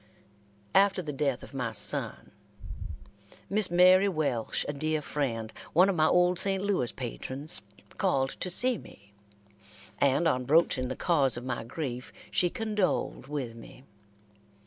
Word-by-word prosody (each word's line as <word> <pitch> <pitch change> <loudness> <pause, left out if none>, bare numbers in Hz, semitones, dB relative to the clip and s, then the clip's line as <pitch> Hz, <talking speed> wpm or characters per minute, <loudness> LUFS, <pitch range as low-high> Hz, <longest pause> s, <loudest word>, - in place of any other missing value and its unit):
After 195 -1 +3
the 150 -2 -5
death 135 -2 -1
of - - -12
my 125 -4 -3
son, 105 -2 0 1.2
Miss 205 -1 +3
Mary 185 +3 +5
Welsh, 145 - -1
a 145 - -2
dear 155 +2 -1
friend, 120 -7 -3 0.2
one 180 +4 +5
of 195 - 0
my 155 -1 +3
old 180 +1 +3
St. 195 -1 -1
Louis 190 -12 0
patrons, 130 - -5 0.4
called 135 0 +1
to 185 - -2
see 245 +7 +5
me, 100 +1 -17 0.9
and 140 +4 +3
on 130 -5 0
broaching 140 -3 +2
the 130 - -4
cause 140 -8 +2
of 120 - -7
my 130 -3 -3
grief, 125 0 -6 0.2
she 175 - +2
condoled 210 - -2
with 135 -5 -4
me. 115 +2 -13
150 Hz, 145 wpm, -28 LUFS, 130-180 Hz, 1.2 s, Mary